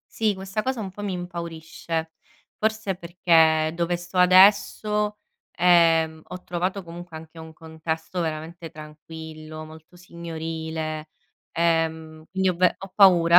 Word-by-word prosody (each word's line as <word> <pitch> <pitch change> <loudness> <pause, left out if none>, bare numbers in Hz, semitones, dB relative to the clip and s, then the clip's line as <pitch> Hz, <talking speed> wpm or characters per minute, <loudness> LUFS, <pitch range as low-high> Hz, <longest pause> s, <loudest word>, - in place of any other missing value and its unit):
sì, 215 -2 0
questa 190 +3 -3
cosa 260 -3 -1
un 195 - -4
po' 205 +2 -9
mi 200 -2 -2
impaurisce, 165 -2 -5 0.5
forse 220 -3 -1
perché 165 -3 +3
dove 175 +1 0
sto 175 +2 -10
adesso, 210 +3 +5 0.4
ehm, 165 -2 +4
ho 180 - -8
trovato 185 +3 -2
comunque 170 0 -9
anche 160 +1 -11
un 160 0 -10
contesto 160 +2 -5
veramente 160 +1 -4
tranquillo, 155 0 -9
molto 160 +2 -14
signorile, 160 -2 -5 0.4
ehm, 160 -1 0
quindi 190 0 +1
ho 175 - -4
ve 180 0 +4
ho 195 -1 -10
paura 175 -4 +7
170 Hz, 130 wpm, -24 LUFS, 160-185 Hz, 0.5 s, paura